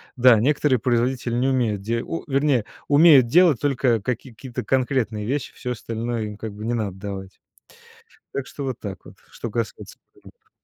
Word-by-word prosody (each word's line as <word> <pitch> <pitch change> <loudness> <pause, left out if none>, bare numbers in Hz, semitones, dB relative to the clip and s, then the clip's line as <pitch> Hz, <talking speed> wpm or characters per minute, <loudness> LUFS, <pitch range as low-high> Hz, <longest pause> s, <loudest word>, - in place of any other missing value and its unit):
да, 125 -2 +6
некоторые 140 +1 +2
производители 120 +1 0
не 130 +2 +1
умеют 115 -6 0
де 115 +3 -1
у 80 - -5
вернее, 135 -4 +2 0.2
умеют 145 -4 +7
делать 165 -2 +5
только 130 -5 +1
какие-то 125 +2 -5
конкретные 125 -5 0
вещи, 135 +3 -3
всё 125 - -5
остальное 115 0 -4
им, 105 -1 -6
как 110 -2 -6
бы, 105 - -9
не 120 - -1
надо 105 -5 -2
давать. 95 -1 -7 0.9
Так 140 - -3
что 140 - -7
вот 130 -3 -4
так 100 -3 -7
вот, - - -13 0.2
что 120 - -6
касается 115 -1 -5 0.2
брендов. - - -20
120 Hz, 170 wpm, -23 LUFS, 110-135 Hz, 0.9 s, умеют